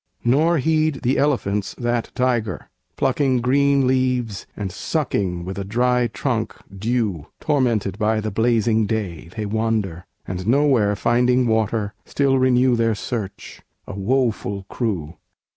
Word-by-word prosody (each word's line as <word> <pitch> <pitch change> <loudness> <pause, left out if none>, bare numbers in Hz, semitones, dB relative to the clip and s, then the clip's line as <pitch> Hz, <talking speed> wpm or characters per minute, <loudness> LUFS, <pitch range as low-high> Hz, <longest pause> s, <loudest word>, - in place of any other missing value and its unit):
Nor 155 +8 +3
heed 155 0 +1
the 130 +2 +2
elephants 105 -9 0
that 120 -1 -1
tiger, 120 -6 -1 0.2
plucking 130 -4 +1
Green 140 +2 +3
leaves, 125 -5 0
and 100 -3 -3
sucking 95 - -2
with 95 +1 -5
a - - -2
dry 125 +4 +1
trunk 115 +1 -2 0.2
dew; 105 -6 -1
Tormented 115 -9 0
by 110 0 +2
the 110 0 -3
blazing 110 0 +2
day, 95 -7 -3
they 110 - -2
wander, 105 -5 -1 0.2
And, 90 +1 -4
nowhere 125 -6 +3
finding 125 +3 +2
water, 110 -2 0
still 135 -2 +1
renew 130 -1 +4
Their 115 -1 +1
search 105 -2 -6 0.2
a - - -7
woful 100 -2 -1
crew! 90 -9 -3
115 Hz, 130 wpm, -22 LUFS, 100-130 Hz, 0.2 s, renew